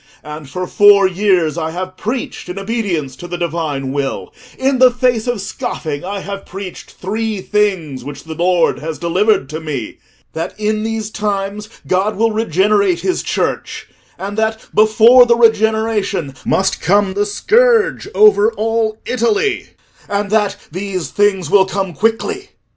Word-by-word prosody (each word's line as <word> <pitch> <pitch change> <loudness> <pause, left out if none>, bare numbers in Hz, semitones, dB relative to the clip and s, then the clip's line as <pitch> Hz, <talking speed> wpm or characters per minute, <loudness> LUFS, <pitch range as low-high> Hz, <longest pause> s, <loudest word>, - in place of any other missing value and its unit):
And 150 -2 -9
for 180 +6 -4
four 200 +1 +5
years 180 -4 +1
I 160 0 -2
have 185 +2 -5
preached 225 -2 -4
in 180 - -6
obedience 195 - -2
to 175 - -8
the 175 0 -4
Divine 155 -6 -3
will: 135 -9 -3 0.2
in 265 0 +1
the 255 0 +7
face 245 -2 0
of 245 -3 -1
scoffing 155 -6 -4
I 195 +2 -4
have 200 0 -6
preached 190 -1 -9
three 215 +2 -3
things, 185 -9 -1
which 145 0 -8
the 160 - -7
Lord 175 0 +1
has 160 0 -5
delivered 180 -2 +1
to 155 +1 -5
me: 145 -8 -5 0.3
that 165 +5 -5
in 215 0 0
these 220 -1 -3
times 205 0 -3 0.2
God 195 +4 0
will 225 +2 +1
regenerate 200 -3 +1
his 370 - -1
Church, - - -3 0.3
and 200 +2 -4
that 220 0 -1
before 225 +4 +6
the 235 - +4
regeneration 220 - +1
must 190 0 +1
come 200 +2 +2
the 205 +1 0
scourge 455 - +2
over 425 +1 +5
all 225 -1 -1
Italy, 235 - 0 0.4
and 205 0 -2
that 210 -2 +1
these 185 0 -4
things 195 -6 +1
will 190 -2 +5
come 190 -2 -3
quickly. 385 - -1
200 Hz, 155 wpm, -16 LUFS, 175-220 Hz, 0.4 s, the